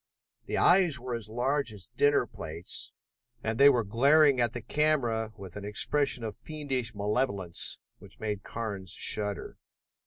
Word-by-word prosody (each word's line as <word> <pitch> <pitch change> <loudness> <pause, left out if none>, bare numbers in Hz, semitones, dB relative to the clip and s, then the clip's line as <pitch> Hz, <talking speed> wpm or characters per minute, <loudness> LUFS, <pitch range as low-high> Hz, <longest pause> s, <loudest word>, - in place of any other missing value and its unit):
The - - -1
eyes 175 -7 +5
were 125 0 -5
as 115 -3 -4
large 130 +3 0
as 100 -4 -5
dinner 145 -1 +3
plates, 80 -5 -6 0.5
and 110 0 -2
they 140 +1 +9
were 125 -4 +3
glaring 135 +5 +4
at 120 -1 +1
the 120 - -5
camera 120 -6 +1
with 95 -3 -10
an 105 - -6
expression 120 +5 0
of 110 -2 -4
fiendish 135 -7 -4
malevolence 100 -4 -1 0.2
which - - -15
made 105 -2 -3
Carnes 105 -6 -5
shudder. 105 +3 -1
115 Hz, 150 wpm, -29 LUFS, 105-140 Hz, 0.5 s, they